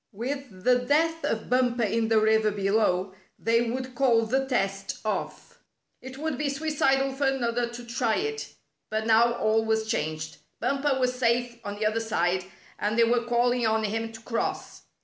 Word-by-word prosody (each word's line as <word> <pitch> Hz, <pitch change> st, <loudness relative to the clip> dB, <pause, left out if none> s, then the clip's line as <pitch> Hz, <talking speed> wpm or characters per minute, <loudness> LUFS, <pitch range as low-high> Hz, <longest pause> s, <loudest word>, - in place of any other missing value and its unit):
With 240 Hz, -3 st, -5 dB
the 250 Hz, 0 st, +4 dB
death 320 Hz, +6 st, +1 dB
of 220 Hz, -, -2 dB
Bumper 250 Hz, -1 st, +2 dB
in 225 Hz, +2 st, +1 dB
the 220 Hz, -1 st, +4 dB
river 220 Hz, 0 st, +3 dB
below, 195 Hz, -2 st, +1 dB, 0.2 s
they 230 Hz, +1 st, +1 dB
would 255 Hz, +1 st, -4 dB
call 235 Hz, -3 st, +3 dB
the 265 Hz, +4 st, 0 dB
test 195 Hz, -6 st, -1 dB
off. 475 Hz, -, -4 dB, 0.4 s
It 260 Hz, +1 st, -9 dB
would 305 Hz, -2 st, -3 dB
be 300 Hz, -1 st, 0 dB
suicidal 275 Hz, -2 st, +1 dB
for 275 Hz, +1 st, 0 dB
another 240 Hz, -3 st, 0 dB
to 240 Hz, 0 st, -9 dB
try 235 Hz, -1 st, 0 dB
it. 440 Hz, +2 st, -3 dB, 0.4 s
But 220 Hz, 0 st, -2 dB
now 230 Hz, +1 st, +4 dB
all 220 Hz, -1 st, +1 dB
was 220 Hz, 0 st, 0 dB
changed. 155 Hz, -7 st, -3 dB, 0.2 s
Bumper 275 Hz, +1 st, 0 dB
was 255 Hz, -1 st, +1 dB
safe 240 Hz, -1 st, 0 dB
on 205 Hz, -, -5 dB
the 215 Hz, +1 st, -2 dB
other 220 Hz, +1 st, +1 dB
side, 185 Hz, -5 st, 0 dB, 0.3 s
and 210 Hz, +2 st, -1 dB
they 235 Hz, -, +6 dB
were 235 Hz, +1 st, +2 dB
calling 240 Hz, 0 st, +2 dB
on 220 Hz, 0 st, +1 dB
him 225 Hz, +2 st, -2 dB
to 225 Hz, -, -10 dB
cross. 230 Hz, 0 st, -3 dB
235 Hz, 175 wpm, -27 LUFS, 220-260 Hz, 0.4 s, they